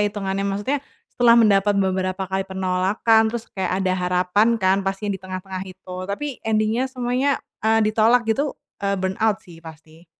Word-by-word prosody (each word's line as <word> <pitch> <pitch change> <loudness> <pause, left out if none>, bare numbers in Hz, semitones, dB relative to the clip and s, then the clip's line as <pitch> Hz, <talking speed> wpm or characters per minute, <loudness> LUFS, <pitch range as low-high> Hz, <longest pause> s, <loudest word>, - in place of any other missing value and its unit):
hitungannya, 195 -1 -3
maksudnya 205 +9 -1 0.3
setelah 235 -1 +5
mendapat 205 -2 +4
beberapa 190 0 0
kali 190 +1 -2
penolakan, 190 +4 +2
terus 230 0 -4
kayak 190 -2 -2
ada 185 - +2
harapan 180 +5 +2
kan 190 -2 +2
pastinya 195 +1 -2
di - - -20
tengah-tengah 185 0 -6
itu, 185 0 -12 0.2
tapi 205 +9 -3
ending-nya, 220 +3 0
semuanya, 255 +2 0 0.2
eee, 225 +1 +3
ditolak 225 +3 +3
gitu, 275 +6 -1 0.2
eee, 200 0 0
burnout 190 +3 0
sih, 165 -2 -14
pasti. 160 +1 -14
200 Hz, 155 wpm, -22 LUFS, 185-225 Hz, 0.3 s, setelah